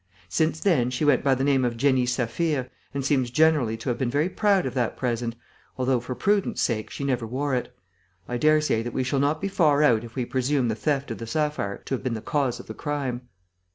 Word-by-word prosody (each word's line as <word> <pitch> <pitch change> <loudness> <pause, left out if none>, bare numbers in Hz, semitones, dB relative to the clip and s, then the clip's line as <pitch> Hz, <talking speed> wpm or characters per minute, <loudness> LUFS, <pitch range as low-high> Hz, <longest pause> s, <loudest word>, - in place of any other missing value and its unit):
Since 160 - 0
then, 145 -11 +2
she 125 +4 -1
went 145 - +4
by 135 -1 +3
the 130 - -1
name 135 -2 +3
of 120 -2 -1
Jenny 130 -1 +2
Saphir 130 +3 -1 0.2
and 140 -1 -3
seems 130 -3 +2
generally 140 -5 +3
to 115 - -4
have 120 - -1
been 130 -3 0
very 145 +7 +1
proud 200 -3 +2
of 130 - -3
that 125 -3 -1
present, 120 -2 -2 0.4
although, 130 -1 +1
for 125 +2 -6
prudence 200 +4 +1
sake, 110 -3 0
she - - -6
never 125 -4 -1
wore 135 +4 -2
it. 125 -1 -1 0.6
I 120 - -2
daresay 155 -4 +3
that 120 +1 -5
we 130 - 0
shall 135 +2 0
not 145 +3 +1
be 195 - -2
far 150 -6 +3
out 115 -6 +4
if 115 -1 -11
we 125 -3 -1
presume 130 0 0
the 110 - 0
theft 140 0 -1
of 115 - -5
the 115 - -6
sapphire 150 -6 -2
to - - -4
have 130 - -1
been 130 -3 -2
the 110 - -5
cause 135 -2 -1
of - - -10
the 110 - -7
crime." 130 -3 -4
130 Hz, 235 wpm, -25 LUFS, 120-145 Hz, 0.6 s, went